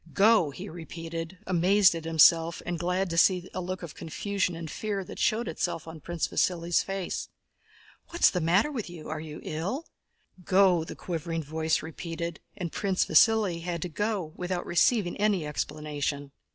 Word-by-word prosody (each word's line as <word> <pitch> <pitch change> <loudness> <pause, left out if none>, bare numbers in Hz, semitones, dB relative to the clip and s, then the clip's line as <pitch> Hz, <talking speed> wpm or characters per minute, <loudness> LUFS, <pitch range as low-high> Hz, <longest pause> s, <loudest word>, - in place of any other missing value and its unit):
"Go!" 205 -5 +5
he 180 +8 -8
repeated, 165 0 -7
amazed 185 +2 +4
at 165 -1 -6
himself 165 +1 +5
and 175 -1 -3
glad 180 +2 0
to 165 - +2
see 180 -1 +3
the 185 - -3
look 185 +1 -5
of 170 - -7
confusion 190 +2 -2
and 165 -1 -6
fear 200 +4 -3
that - - -10
showed 220 +1 +1
itself 165 0 -3
on 160 0 -8
Prince 170 +1 -2
Vasíli's 170 -1 +1
face. 195 -2 -4 0.8
"What's 340 - +4
the 180 - -1
matter 185 - +3
with 230 -10 -4
you? 170 -3 -9
Are 155 0 -3
you 155 -1 -8
ill?" 195 - -3 0.6
"Go!" 185 -2 +4
the - - -8
quivering 165 -1 -4
voice 160 +2 0
repeated. 165 +1 -5 0.2
And 175 -3 -4
Prince 195 -2 0
Vasíli 195 0 +4
had 170 -1 -3
to 180 - -4
go 195 -3 -2
without 180 0 -3
receiving 180 +1 +2
any 200 -6 +1
explanation. 150 -1 -3
175 Hz, 165 wpm, -28 LUFS, 160-190 Hz, 0.8 s, Go